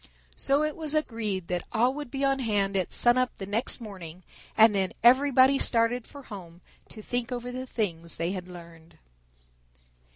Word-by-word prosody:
So 280 +2 +1
it 305 -1 -2
was 310 -2 -4
agreed 220 - -2
that 180 -1 -1
all 245 +3 +2
would 290 -2 -7
be 275 +2 -1
on 270 0 +1
hand 205 -5 0
at 185 -2 -1
sun 240 +1 +4
up 255 0 -1
the 195 - -6
next 220 +7 -1
morning, 185 -6 -10 0.3
and 220 0 +7
then 190 -2 -1
everybody 265 +2 +5
started 230 +1 +1
for 285 -1 -12
home 180 -6 -11 0.3
to 215 - -11
think 245 +1 -3
over 245 0 -4
the 255 +1 -6
things 170 -9 -2
they 170 +2 -2
had 185 -2 -6
learned. 170 -2 -13
230 Hz, 175 wpm, -27 LUFS, 185-255 Hz, 0.3 s, and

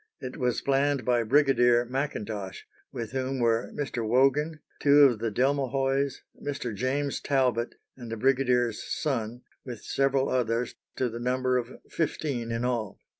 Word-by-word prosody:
It 130 -1 -6
was 125 -1 0
planned 140 -2 +1
by 120 -1 +3
Brigadier 120 -1 +4
Macintosh, 110 -7 -4 0.3
with 115 -2 -5
whom 130 +1 -2
were 115 -1 +1
Mr. 135 -5 -3
Wogan, 135 +7 +2 0.2
two 145 0 +7
of 125 -6 +5
the 115 0 -1
Delmehoys, 135 +2 0 0.2
Mr. 140 -5 -4
James 135 +6 -1
Talbot, 125 -4 +1 0.2
and 120 -3 -9
the 115 - -3
brigadier's 125 -2 +2
son, 125 -5 -3 0.2
with 120 -4 -8
several 135 0 +1
others, 120 -1 0 0.2
to 130 - 0
the 115 0 -6
number 130 +1 0
of 120 +1 -8
fifteen 140 -7 -2
in 115 +1 -1
all. 115 -5 -2
125 Hz, 145 wpm, -27 LUFS, 120-135 Hz, 0.3 s, two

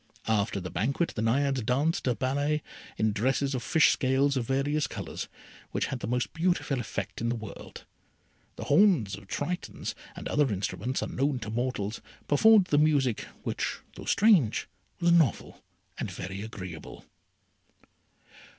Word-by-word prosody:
After 105 -2 +1
the 90 -1 -6
banquet 135 - 0
the 110 - -2
Naiades 135 +4 +1
danced 140 +7 +1
a 125 - +2
ballet 145 +4 0 0.3
in 110 0 +2
dresses 130 +6 0
of 130 - -2
fish 160 +5 +4
scales 135 +1 +2
of 120 -3 -1
various 140 +2 +1
colours, - - -6 0.4
which - - -1
had 130 - -3
the - - -4
most 120 -3 -1
beautiful 165 -5 0
effect 100 -3 -4
in 115 - 0
the 120 - 0
world. 110 -2 -9 0.7
The - - -6
horns 145 - +4
of 100 0 -13
Tritons, 180 - -3 0.2
and - - -6
other 145 -4 +2
instruments 105 +5 -2
unknown 135 +1 0
to 110 - -5
mortals, 115 -3 -2 0.3
performed 210 +6 +6
the 145 - +5
music, 145 -7 +2 0.2
which, - - -2 0.2
though - - -9
strange, 200 - +4 0.3
was 170 -1 +3
novel 165 -7 +2 0.4
and - - -2
very 95 +2 -6
agreeable. 95 -7 -8
130 Hz, 150 wpm, -28 LUFS, 110-145 Hz, 0.7 s, performed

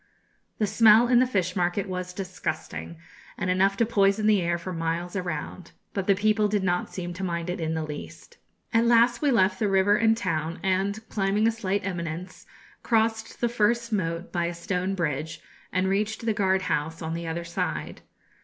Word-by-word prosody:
The 215 - +1
smell 220 +2 +6
in 245 0 +5
the 255 - +4
fish 185 -6 -1
market 180 +2 0
was 180 -1 -4
disgusting, 180 -3 -5 0.4
and 185 - -1
enough 195 +2 +2
to 230 - +3
poison 200 -1 +2
the 210 -3 +4
air 170 0 0
for 180 +2 -6
miles 165 +2 -3
around, 175 -1 -5 0.2
but 195 -2 -3
the 200 - +5
people 215 +1 +2
did 205 -1 0
not 180 -1 0
seem 175 -1 -5
to 190 +3 -6
mind 170 -1 -2
it 180 - -4
in 160 0 -1
the 160 - -2
least. 155 - -9 0.3
At 230 +1 +4
last 235 0 +4
we 295 - +3
left 190 -6 +3
the 215 - +1
river 195 +1 +4
and 225 +1 +3
town, 165 -4 -2
and, 195 +3 0
climbing 205 +2 +1
a - - +4
slight 200 -3 -2
eminence, 175 -1 -5 0.3
crossed 225 -1 0
the 240 - +3
first 235 0 +1
moat 170 -3 -2
by 175 -1 0
a 170 0 -3
stone 180 +2 -2
bridge, 160 -2 -2 0.3
and 185 +1 +1
reached 210 +4 -1
the 225 - +2
guard 190 -2 +1
house 160 +1 -2
on 160 0 -3
the 170 0 -4
other 165 +1 -3
side. 80 - -4
190 Hz, 190 wpm, -26 LUFS, 170-215 Hz, 0.4 s, smell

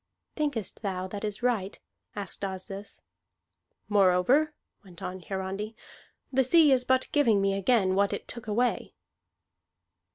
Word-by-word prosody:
"Thinkest 285 - -2
thou 185 -3 -2
that 205 +2 -6
is 210 +2 -4
right?" 215 -6 0 0.4
asked 200 -1 -4
Asdis. 195 +1 -6 0.8
"Moreover," 205 +10 +3 0.3
went 180 -4 -13
on 185 +1 -5
Hiarandi, 195 +4 -4 0.6
"the 265 +1 +4
sea 305 +3 +5
is 255 -1 +4
but 260 0 +2
giving 235 -9 +4
me 195 0 +2
again 195 -1 +2
what 200 +1 +2
it - - -5
took 235 -2 -7
away." 240 +4 0
205 Hz, 130 wpm, -28 LUFS, 195-250 Hz, 0.8 s, sea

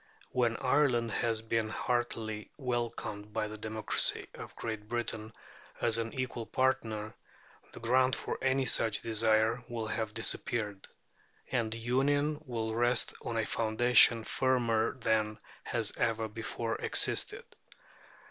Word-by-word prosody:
When 120 -2 +1
Ireland 125 -4 +2
has 115 0 -1
been 110 -1 0
heartily 110 -3 -2
welcomed 120 -5 -3
by 105 - -1
the 110 0 -7
democracy 110 0 +1
of - - -10
Great 110 -2 -5
Britain 115 -2 -3 0.5
as 115 -1 +2
an 115 0 -3
equal 120 -3 -3
partner, 110 -5 0 0.6
the - - -10
ground 130 +2 +3
for - - -4
any 135 0 +2
such 110 -4 +1
desire 110 +1 +2
will 115 -2 -3
have 110 -1 -3
disappeared, 105 -3 -2 0.6
and 115 -4 0
Union 145 +6 +1
will 110 -2 -2
rest 120 +1 +2
on 115 - -3
a 110 - +1
foundation 115 +1 +5
firmer 120 -2 +1
than 110 -3 0 0.3
has 115 -4 -1
ever 115 -1 0
before 115 +1 -4
existed. - - +2
115 Hz, 125 wpm, -31 LUFS, 110-120 Hz, 0.6 s, foundation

